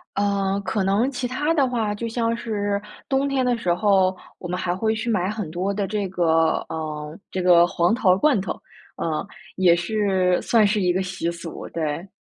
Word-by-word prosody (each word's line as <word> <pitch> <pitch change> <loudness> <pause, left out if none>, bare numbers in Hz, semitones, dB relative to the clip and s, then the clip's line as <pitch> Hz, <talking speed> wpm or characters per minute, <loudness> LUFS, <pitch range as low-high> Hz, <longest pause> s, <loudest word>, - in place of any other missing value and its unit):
呃， 200 -1 0
可 195 +1 -1
能 210 +8 +2
其 250 -1 -3
他 295 +6 0
的 280 -5 +3
话， 225 -4 -1
就 230 +3 -4
像 230 0 0
是 205 -3 -2 0.3
冬 275 +1 +1
天 265 -2 +1
的 245 -1 +2
时 180 -6 -1
候， 190 -1 +3 0.2
我 175 - -6
们 180 +1 -2
还 175 -1 -1
会 220 +3 0
去 230 +2 -3
买 185 -3 0
很 210 -6 -4
多 185 +4 -1
的 200 -1 -2
这 205 -1 -2
个， 165 -3 +2
呃， 155 -1 -5
这 185 - -3
个 175 -1 +6
黄 175 +5 +1
桃 185 -6 +3
罐 275 -3 +3
头， 190 - -4 0.4
呃， 155 -2 -2 0.3
也 180 -2 +5
是 185 0 +1
算 225 -3 +3
是 205 0 +1
一 180 - +2
个 185 +2 0
习 180 -2 -3
俗， 170 -1 -7
对。 160 +2 -3
195 Hz, 210 characters per minute, -23 LUFS, 175-220 Hz, 0.4 s, 个